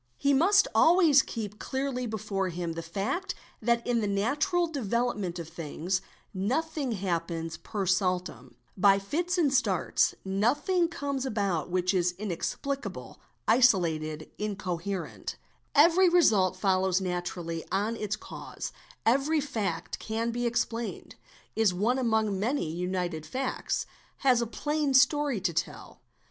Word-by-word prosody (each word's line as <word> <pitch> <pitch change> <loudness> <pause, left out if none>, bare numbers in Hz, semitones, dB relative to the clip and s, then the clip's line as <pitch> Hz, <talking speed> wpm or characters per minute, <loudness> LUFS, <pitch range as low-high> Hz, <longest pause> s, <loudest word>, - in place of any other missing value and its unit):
He 280 - +2
must 390 +8 +5
always 325 -5 +6
keep 210 -5 -6
Clearly 265 -2 -2
before 200 -3 -2
him 170 -1 -3
the 165 - -5
fact 205 - -3 0.3
that 235 +1 +1
in 240 -2 +1
the 210 - 0
natural 290 - +1
development 235 - -1
of 170 -2 -6
things 170 +3 -3 0.3
nothing 265 +7 -1
happens 170 -4 -3
per 200 +2 -4
saltwm, 180 -9 -1 0.2
by 195 +1 +5
fits 335 - -1
and 295 -6 +3
starts, 270 - +2
nothing 290 - +2
comes 285 -5 -3
about 200 - -1
vhich 185 +1 +1
is 180 -1 +1
inexplicable, 215 +8 -4 0.3
isolated, 165 -10 +2
incoherent: 190 -3 -4 0.4
every 340 +5 +6
result 215 - +4
follows 190 -1 +2
naturally 175 -2 -3
Or - - -26
on 210 +4 0
its 210 -2 -2
cause, - - -7 0.3
every 275 +7 +3
fact 200 - -3
can 225 +1 -2
be 240 +1 -1
explained, 235 -1 -2 0.4
is 220 -5 +3
one 235 +8 +1
among 220 -5 +1
many 225 - -1
united 175 -2 -3
acts, 265 0 -1 0.4
has 250 -3 +5
a 235 - -1
plain 295 +3 -1
story 280 -2 +4
to 175 -2 0
tell. - - -4
215 Hz, 130 wpm, -28 LUFS, 185-270 Hz, 0.4 s, always